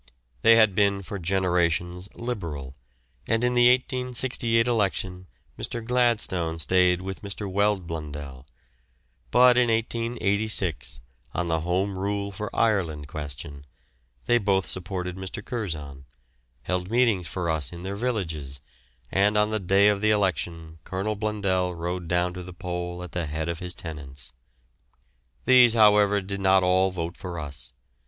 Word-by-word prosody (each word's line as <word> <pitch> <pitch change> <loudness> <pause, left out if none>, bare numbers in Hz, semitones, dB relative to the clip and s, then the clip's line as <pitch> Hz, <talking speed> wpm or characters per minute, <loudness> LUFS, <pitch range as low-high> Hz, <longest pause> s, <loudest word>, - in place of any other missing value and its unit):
They 115 - +7
had 110 -3 +5
been 100 0 +2
for 100 +2 -6
generations 90 0 0
Liberal, 85 - -5 0.5
and 115 +1 +1
in 125 0 +2
the 120 0 +6
1868 125 -2 +1
election 95 -5 -1 0.3
Mr. 115 -1 -4
Gladstone 115 -9 +1
stayed 90 +2 +3
with 95 0 -6
Mr. 100 0 -5
Weld 100 -1 +1
Blundell; 75 -5 -7 0.8
but 125 - +6
in 120 -1 +3
1886, 110 - -1 0.3
on 90 0 -1
the 80 0 +1
Home 90 +4 -1
Rule 100 +1 -2
for 105 +2 -5
Ireland 85 -10 0
question, 70 -1 -7 0.6
they 120 - +3
both 95 -3 +1
supported 90 0 -4
Mr. 95 +3 -6
Curzon, 75 - -5 0.6
held 90 +4 -2
meetings 115 -7 +2
for 85 +4 -3
us 75 -5 -2
in 85 0 -9
their 95 +1 -4
villages, 80 - -3 0.5
and 105 +2 +3
on 105 +1 +2
the 110 - 0
day 95 +2 +4
of 105 -1 +2
the 110 - +3
election 85 -5 -1
Colonel 100 +3 -3
Blundell 100 -4 -1
rode 85 +1 -4
down 90 +1 +1
to 90 - -7
the 90 0 -9
poll 90 -1 -5
at 90 - -9
the 85 -3 -2
head 80 +2 -3
of 85 -1 -3
his 90 -1 -5
tenants. 70 -5 -8 1.1
These, 125 -2 +6
however, 105 -2 +5
did 100 +1 -5
not 95 -1 +4
all 95 +1 +3
vote 85 -2 -4
for 90 -2 -7
us. 70 -4 -8
95 Hz, 145 wpm, -25 LUFS, 85-105 Hz, 1.1 s, They